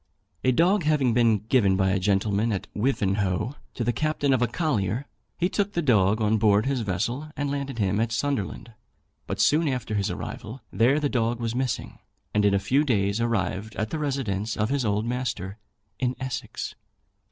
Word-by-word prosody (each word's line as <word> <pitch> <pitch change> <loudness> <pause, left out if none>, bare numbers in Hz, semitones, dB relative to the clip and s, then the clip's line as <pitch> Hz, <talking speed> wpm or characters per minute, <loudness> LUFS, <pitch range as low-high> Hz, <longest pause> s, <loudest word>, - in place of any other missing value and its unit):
A 130 - +4
dog 180 +9 +3
having 150 -6 +2
been 115 -2 +4
given 110 -5 +3
by 95 -1 +2
a 95 - +1
gentleman 100 +3 +1
at 95 - -2
Wivenhoe 105 -1 0 0.2
to 120 - -2
the 120 +1 +1
captain 150 0 +1
of 130 - +2
a 125 - +3
collier, 120 - -1 0.3
he 175 - +2
took 205 +1 -1
the 170 - 0
dog 105 -5 +3
on 110 0 +2
board 105 0 +4
his 135 -2 0
vessel, 115 +9 -2
and 145 -1 -1
landed 140 -3 -3
him 100 -1 +1
at 115 0 0
Sunderland; 115 -3 -2 0.5
but - - -3
soon 155 +2 +4
after 125 -5 -2
his 100 -2 0
arrival 120 +5 -6
there 120 +9 +3
the 150 - +1
dog 120 -3 0
was 115 -1 -2
missing, 125 -2 -3 0.3
and 105 0 +3
in 100 -1 +4
a - - +4
very 95 - -5
few 140 +3 +3
days 105 -5 +1
arrived 110 -2 -1
at 110 0 -2
the 160 - -2
residence 115 -8 -2
of 110 +1 0
his 140 -1 0
old 105 0 0
master, 115 -5 -3 0.4
in 125 -1 0
Essex. 130 -1 -4
115 Hz, 190 wpm, -26 LUFS, 105-135 Hz, 0.5 s, A